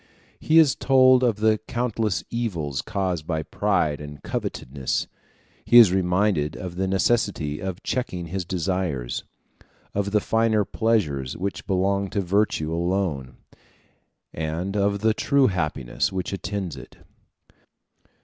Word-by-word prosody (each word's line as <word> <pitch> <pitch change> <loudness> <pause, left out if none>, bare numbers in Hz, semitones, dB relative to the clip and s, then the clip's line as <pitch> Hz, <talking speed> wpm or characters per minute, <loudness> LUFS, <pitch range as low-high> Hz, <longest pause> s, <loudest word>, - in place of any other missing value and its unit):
He 160 - +2
is 155 -5 +6
told 130 -1 +5
of 120 -4 +3
the 110 0 +2
countless 115 -4 -1
evils 85 - -2
caused 95 -6 -3
by 80 -3 -1
pride 80 -9 0
and 75 -2 -10
covetousness: 65 0 -3 0.6
he 120 - +5
is 115 -6 +9
reminded 90 -4 +1
of 90 -1 -6
the 95 +1 -1
necessity 95 -6 0
of 95 0 -5
checking 95 -9 -3
his 90 +3 -3
desires, 85 -7 -2 0.7
of 100 0 -1
the 105 +1 +2
finer 110 -1 +1
pleasures 85 - 0
which 100 +2 -4
belong 100 +1 +1
to 100 - -1
virtue 90 -4 0
alone, 85 -7 -2 1.0
and 80 +5 -3
of 100 0 +1
the 110 0 +3
true 140 +4 +2
happiness 75 - -1
which 95 0 -3
attends 95 -3 -4
it. 65 -1 -12
95 Hz, 130 wpm, -24 LUFS, 80-105 Hz, 1.0 s, is